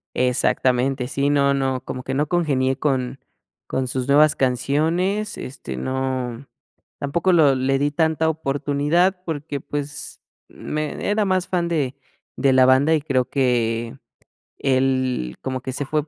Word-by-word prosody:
Exactamente. 125 +1 +1
Sí, 140 +2 0
no, 140 -1 +3
no, 135 -2 -1
como 130 - -5
que 130 - -4
no 145 +3 +1
congenié 135 -7 +1
con 130 -2 -1 0.5
con 130 0 -1
sus 130 +1 -3
nuevas 150 +2 +5
canciones, 160 - 0
este, 70 - -7
no, 130 - -3 0.5
tampoco 170 +6 0
lo 155 -5 +5
le 135 +1 +1
di 145 +1 0
tanta 160 0 +1
oportunidad, 160 +4 0
porque, 145 -3 -4
pues, 145 +1 -5 0.3
mm, - - -21 0.2
me 155 +4 -3
era 210 0 +2
más 185 -1 +1
fan 175 -2 0
de 145 -6 -1 0.4
de 135 -2 +3
la 130 0 +6
banda, 135 +5 +4
y 155 - +2
creo 130 -4 0
que 120 -2 0 0.6
él 130 - 0
como 130 -1 -3
que 130 -1 -5
se 145 - -2
fue 150 +2 -1
140 Hz, 150 wpm, -22 LUFS, 130-155 Hz, 0.6 s, la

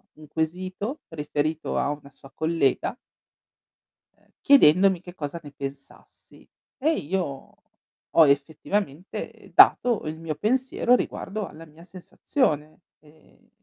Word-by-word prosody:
un 155 0 -14
quesito 185 - -3
riferito 155 0 -2
a 140 - +1
una 145 -1 -7
sua 135 0 -17
collega 160 -4 0 1.2
ehm, - - -32
chiedendomi 190 - +5
che 180 -1 -11
cosa 155 0 -5
ne 145 - -10
pensassi. 135 -1 -11 0.3
E 300 +4 +2
io 160 - -4 0.6
ho 160 -2 +8
effettivamente 155 +4 -2
dato 240 -3 +6
il 155 +1 -4
mio 160 -2 -4
pensiero 250 - +2
riguardo 210 -4 -3
alla 160 +1 -12
mia 160 +2 -17
sensazione 175 - -2 0.2
e 155 +1 -24
160 Hz, 115 wpm, -25 LUFS, 150-190 Hz, 1.2 s, ho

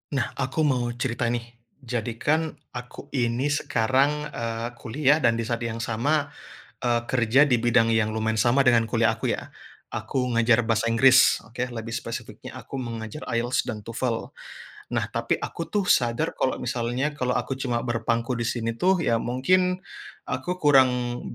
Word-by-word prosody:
Nah, 125 -3 -1
aku 135 +4 0
mau 130 -5 +1
cerita, 120 -1 -1
nih. 120 0 -1 0.4
Jadi, 120 -2 -3
kan, 155 +5 0 0.2
aku 125 -1 -9
ini 125 +2 0
sekarang, 145 +3 +1
eee, 115 -2 -3
kuliah 145 +5 +2
dan 120 -6 +3
di 115 - -2
saat 115 0 -2
yang 115 -1 -4
sama, 140 +6 0 0.5
eee, 120 -1 +1
kerja 125 +2 +4
di 125 -5 +2
bidang 115 -1 +3
yang 110 -1 +1
lumayan 110 0 0
sama 125 +4 +4
dengan 120 -3 +4
kuliah 115 0 +2
aku, 110 - -1
ya. - - -10 0.4
Aku 125 +3 -2
ngajar 115 0 +4
bahasa 115 0 +1
Inggris. 130 +3 +5
Oke, 125 +2 -4
lebih 115 -2 -6
spesifiknya, 115 0 -6
aku 135 - -7
mengajar 115 +2 -6
IELTS 120 +1 0
dan 110 -3 -5
TOEFL. 115 +1 -3 0.7
Nah, - - +1
tapi - - 0
aku, 165 - -5
tuh, 205 -2 0
sadar 120 -1 +2
kalau 130 - +1
misalnya 125 +4 -2
kalau 125 -3 -1
aku 125 +2 -2
cuma 120 -3 -1
berpangku 115 0 -1
di 120 -1 -1
sini, 115 -1 -2
tuh, 180 +8 +1
ya, 115 -4 +2
mungkin 180 +10 +2 0.5
aku 135 +8 -3
kurang 125 -6 +3
120 Hz, 165 wpm, -25 LUFS, 115-130 Hz, 0.7 s, Inggris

